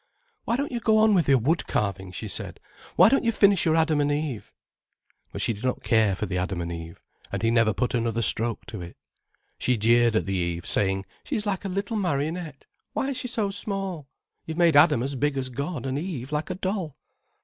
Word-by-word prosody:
"Why 235 - +1
don't 280 +2 -2
you 240 - -2
go 220 -1 +3
on 215 0 +5
with 175 -7 +2
your 135 - +6
wood 150 +8 0
carving?" 95 -2 -2
she 110 +4 -6
said. 100 - -6 0.4
"Why - - +7
don't 275 +5 +3
you 230 - +2
finish 200 -4 +4
your 160 -1 +3
Adam 160 -2 +2
and 145 0 +1
Eve?" 145 -6 -3 0.8
But - - -2
she 115 - +2
did 105 +2 -10
not 130 0 -1
care 110 -4 +3
for 105 - -3
the 90 -3 -2
Adam 90 0 -2
and 85 0 -4
Eve, 80 0 -8 0.3
and - - -3
he 115 - +3
never 115 -2 +4
put 125 +4 -1
another 115 -1 0
stroke 115 +1 +2
to 110 -5 -7
it. 85 0 -10 0.6
She 125 -1 +1
jeered 115 +1 +4
at - - +1
the 95 - -2
Eve, 85 -2 -2
saying, 95 -1 0 0.2
"She - - -3
is 210 - -2
like 200 -1 -2
a - - -2
little 200 +4 -2
marionette. 160 -3 -2 0.3
Why 270 - -1
is 270 - -3
she - - -4
so 220 -4 -1
small? 195 - -4 0.4
You've 160 0 -5
made 170 -3 +4
Adam 145 -4 +6
as 140 +2 -3
big 145 +2 0
as 130 -1 -2
God, 140 +2 -4
and 135 +1 -1
Eve 150 -7 -5
like 150 +3 -2
a 185 - -2
doll." 185 -5 -3
140 Hz, 225 wpm, -25 LUFS, 110-185 Hz, 0.8 s, Why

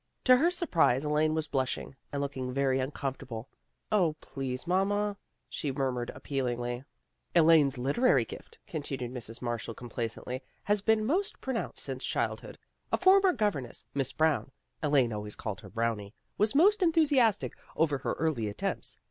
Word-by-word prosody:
To 255 -1 +7
her 325 +7 +4
surprise 165 - +2
Elaine 155 +1 +2
was 160 -1 -1
blushing, 130 0 -2 0.2
and 140 -1 -1
looking 130 -2 -3
very 135 0 +1
uncom 135 0 -2
fortable. 120 -5 -7 0.2
" - - -12
0, 175 -7 +3
please, 130 -2 -5
mamma," 200 +3 +1 0.3
she 145 - -3
murmured 130 -3 -1
appealingly. 120 -3 -2 0.3
" - - -44
Elaine's 155 -5 +6
literary 140 - +3
gift," 460 - -11
continued 140 - -4
Mrs. 115 -1 -5
Marshall 115 -2 -3
complacently, 120 +2 -4
" - - -39
has 205 0 +2
been 220 +1 +3
most 370 - 0
pro 265 - -3
nounced 230 - -3
since - - -4
her - - -1
childhood. - - -3 0.3
A - - +3
former 380 0 +6
govern 205 - 0
ess, - - -10
Miss 135 -1 -1
Brown 155 -2 +1 0.3
Elaine 140 -6 +3
always 105 0 -5
called 105 -3 -5
her - - -11
Brownie 115 -2 -2 0.2
was 210 +5 +2
most 400 +7 +5
enthusiastic 290 - +3 0.2
over 150 -4 +2
her - - -1
early 150 -9 0
attempts. 105 - -3
140 Hz, 165 wpm, -30 LUFS, 125-205 Hz, 0.3 s, To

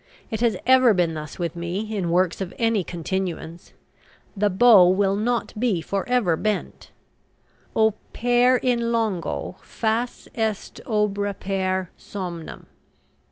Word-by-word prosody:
It 220 0 -3
has 230 -5 +2
ever 255 -3 +6
been 175 -3 +1
thus 155 -1 -7
with 170 -2 -3
me 185 +6 -4
in 185 -4 -1
works 180 +2 +1
of 185 -2 -5
any 225 -4 +1
continuance. 175 -1 -5 0.6
The 205 +1 +2
bow 200 -2 +7
will 195 +1 +2
not 235 +3 -1
be 225 -7 +1
for 195 +7 -3
ever 235 -10 +2
bent: 210 +4 -3 0.9
"Opere 245 +3 +2
in 235 -2 +1
longo 220 -7 -2
fas 230 +2 -2
est 220 -3 -3
obrepere 195 -3 -1
somnum." 175 -5 -7
200 Hz, 120 wpm, -23 LUFS, 180-230 Hz, 0.9 s, bow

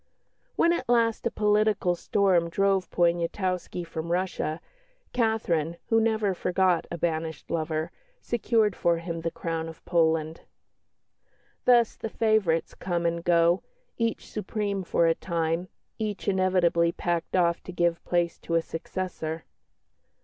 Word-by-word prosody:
When 340 - +4
at 260 -8 -3
last 230 -1 +2
a - - 0
political 210 -4 +2
storm 175 -1 +2
drove 195 +1 +1
Poniatowski 175 +1 0
from 165 0 -5
Russia, 175 -3 -1 0.5
Catherine, 175 -9 0
who 225 0 +4
never 220 -3 +1
forgot 180 -1 +1
a 170 - -4
banished 160 -1 -3
lover, 160 -1 -1 0.3
secured 225 -4 +1
for 170 -1 +2
him 165 0 -5
the 165 - -1
crown 165 -1 -4
of 160 - -13
Poland. 160 -2 +1 1.2
Thus 240 -2 +5
the 225 - -5
favourites 215 -8 +1
come 175 -2 -2
and 170 0 0
go, 170 +1 +4 0.3
each 230 -2 -2
supreme 205 -1 -3
for 170 -1 +2
a 165 - +4
time, 165 0 -2 0.3
each 210 -4 -3
inevitably 180 -3 +2
packed 170 0 -2
off 170 -2 +2
to - - -8
give 175 -1 0
place 175 -1 0
to 170 - -3
a 165 - +4
successor. 165 -2 -5
175 Hz, 135 wpm, -27 LUFS, 165-205 Hz, 1.2 s, Thus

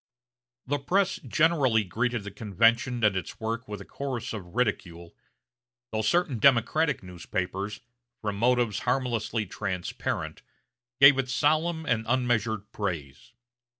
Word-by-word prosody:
The 145 +2 -1
press 190 +7 +1
generally 135 -4 +2
greeted 120 +4 -1
the 105 - -7
convention 115 +4 +1
and 105 -2 +4
its 95 - -5
work 115 +2 -3
with 105 0 -6
a - - -10
chorus 125 -5 -5
of 95 -3 -8
ridicule, 85 -9 -2 0.8
though 110 -1 -1
certain 135 +2 +1
Democratic 140 +3 +3
newspapers, 90 +3 -4 0.4
from 105 -2 -3
motives 120 -2 +2
harmlessly 120 -4 -1
transparent, 90 -1 -4 0.6
gave 140 0 +8
it 130 -1 -1
solemn 155 +4 +1
and 115 -5 +1
unmeasured 115 -4 0
praise. 85 - -5
115 Hz, 120 wpm, -27 LUFS, 105-130 Hz, 0.8 s, gave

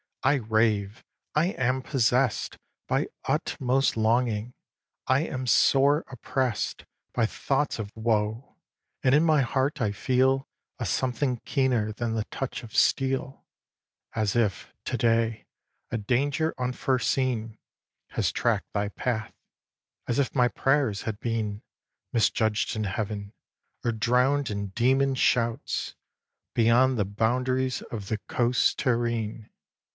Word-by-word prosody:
I 140 +2 +4
rave; 110 -3 0 0.3
I 155 +3 +3
am 130 -5 0
possess'd 125 -2 +1 0.3
By - - +1 0.2
utmost 130 0 +1
longing. 115 0 +1 0.5
I 130 +2 +3
am 130 -5 -3
sore 140 +4 +4
oppress'd 130 -1 -2 0.3
By 115 - +2
thoughts 140 +5 -1
of 105 -2 -5
woe; 110 +1 -1 0.5
and 130 - +4
in 150 +3 +5
my 155 -3 +4
heart 135 +4 0
I 105 -3 +1
feel 130 +4 +1 0.3
A - - -2
something 130 0 0
keener 125 -6 +1
than 115 +1 -3
the 110 -1 -1
touch 135 +1 -5
of 110 - -11
steel, 135 0 +1 0.7
As 110 -1 0
if, 110 -5 0
to - - -1
day, 115 -1 +1 0.5
a 120 - 0
danger 140 +8 0
unforeseen 125 -2 0 0.5
Had - - -2
track'd - - 0
thy 100 0 0
path, 110 0 -3 0.7
as 120 - 0
if 135 -4 0
my 125 -2 +4
prayers 135 -5 +1
had 110 -2 -4
been 110 -3 -2 0.5
Misjudged 110 0 +1
in 110 - -1
Heaven, 100 +1 -4 0.5
or 120 - +1
drown'd 125 +5 +2
in 100 0 -3
demon 130 +6 +2
shouts 115 -2 0 0.6
Beyond 120 +3 +4
the 105 - +1
boundaries 125 +5 0
of 105 -4 -5
the 110 - -1
coasts 125 +1 +2
terrene. 115 -3 -1
120 Hz, 125 wpm, -27 LUFS, 110-130 Hz, 0.7 s, in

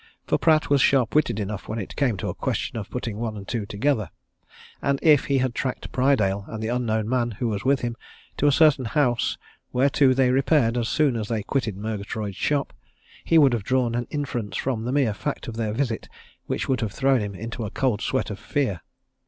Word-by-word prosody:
For - - +1
Pratt 155 -2 +3
was 140 -2 +3
sharp 130 -4 +3
witted 150 -8 +2
enough 105 0 -4
when 110 - -4
it 100 - -6
came 125 -8 +1
to - - -4
a - - -2
question - - -3
of 110 -4 -5
putting 115 -4 -4
one 110 -1 -3
and 100 -1 -9
two 110 -4 -3
together, 110 - 0 0.7
and 140 0 +1
if 150 -4 +5
he 140 - +1
had 130 -2 0
tracked 130 0 -3
Prydale 110 -7 +2
and 110 - -6
the 110 - -1
unknown 110 -3 0
man 120 -1 +1
who 120 +4 -2
was 100 -2 -3
with 135 0 +2
him 120 -1 -2 0.4
to 145 - +2
a - - +6
certain 145 -3 +4
house 120 -2 +1 0.3
whereto 135 0 +3
they 130 -1 +3
repaired 130 -3 +3
as 120 -2 -1
soon 150 -5 +2
as 110 -2 -3
they 110 -2 -2
quitted 110 -5 -2
Murgatroyd's 105 -1 -4
shop, 145 +7 -1 0.5
he 165 - +3
would 140 -5 +6
have 115 -4 -1
drawn 125 +1 +1
an 120 0 -2
inference 135 -8 -3
from 120 -4 -2
the 125 - -1
mere 135 -6 +2
fact 145 +7 -4
of 115 - -5
their 110 -2 -1
visit 115 0 -2 0.4
which - - -2
would 130 -3 0
have 110 -3 -2
thrown 135 -1 +3
him 100 -1 -4
into 115 +4 -5
a 105 - -3
cold 120 -3 0
sweat 130 -4 -1
of 100 - -6
fear. 125 - -1
120 Hz, 220 wpm, -24 LUFS, 110-135 Hz, 0.7 s, a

